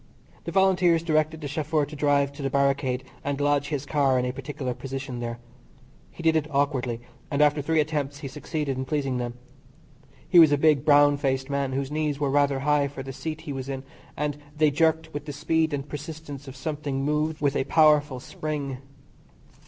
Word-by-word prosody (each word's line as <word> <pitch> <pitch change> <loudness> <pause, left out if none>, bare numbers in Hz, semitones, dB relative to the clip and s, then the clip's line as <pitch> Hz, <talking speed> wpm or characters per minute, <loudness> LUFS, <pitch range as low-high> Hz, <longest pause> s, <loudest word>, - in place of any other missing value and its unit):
The 170 - -3
Volunteers 180 -3 +3
directed 155 -1 +1
the 145 - -4
chauffeur 150 +1 0
to 150 - -10
drive 145 -1 +2
to 140 - -9
the 135 - -1
barricade 135 -2 +1 0.2
and 140 0 -2
lodge 145 0 +2
his 145 -2 -3
car 140 -3 +2
in 125 - +1
a 125 - -2
particular 135 -1 -4
position 135 -1 -6
there. 120 0 -4 0.7
He 170 - -11
did 160 0 +4
it 155 -1 +1
awkwardly, 135 -5 0 0.3
and 140 - -1
after 150 0 +4
three 160 +3 +1
attempts 145 -2 -1
he 140 - -4
succeeded 140 +1 -3
in 130 - -2
pleasing 135 -3 -1
them. 120 -1 -4 0.9
He 180 - +6
was 160 -3 +8
a 145 - +4
big, 150 -2 +4
brown 145 -1 +5
faced 135 -1 -1
man, 140 -1 -1
whose 135 +1 -2
knees 150 -2 -1
were 140 -2 0
rather 140 -1 +2
high 145 0 +2
for 135 -1 -7
the 135 0 -7
seat 155 +3 -5
he 155 -3 -5
was 135 0 -5
in, 135 -1 -4 0.3
and 150 0 -1 0.2
they 155 -1 +4
jerked 160 +1 +1
with 145 0 -5
the 145 - -5
speed 160 +2 +1
and 140 -1 -3
persistence 150 -2 -7
of 135 - -8
something 140 -1 -3
moved 150 +1 0
with 140 -1 +1
a - - +1
powerful 150 -3 +4
spring. 145 -2 -4
145 Hz, 200 wpm, -26 LUFS, 135-155 Hz, 0.9 s, was